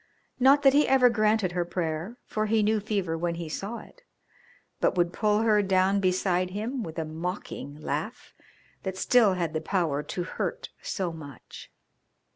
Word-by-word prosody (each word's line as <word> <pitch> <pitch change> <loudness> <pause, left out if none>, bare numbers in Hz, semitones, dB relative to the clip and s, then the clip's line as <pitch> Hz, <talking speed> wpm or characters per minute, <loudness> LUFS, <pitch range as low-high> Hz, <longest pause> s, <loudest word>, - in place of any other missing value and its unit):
Not 275 +3 +5
that 270 -1 +6
he 295 +1 +4
ever 255 -2 +5
granted 215 -4 +2
her 175 0 0
prayer, 170 +4 -3
for 215 0 -2
he 220 0 +2
knew 215 +1 +2
fever 200 -5 -2
when 170 +1 -2
he 170 -1 -5
saw 200 +9 -5
it, - - -14 0.8
but - - +1
would 175 0 +2
pull 210 0 +2
her 215 -2 +4
down 190 0 +2
beside 185 -1 +1
him 220 +7 -3
with 160 -6 -7
a 160 - -1
mocking 160 -2 -5
laugh 155 - -5 0.5
that 190 -1 -4
still 220 -3 +4
had 170 -3 -2
the 155 - -1
power 160 -5 0
to 175 +4 -4
hurt 175 - -4
so 180 -4 -3
much. 145 -5 -11
190 Hz, 170 wpm, -27 LUFS, 170-215 Hz, 0.8 s, that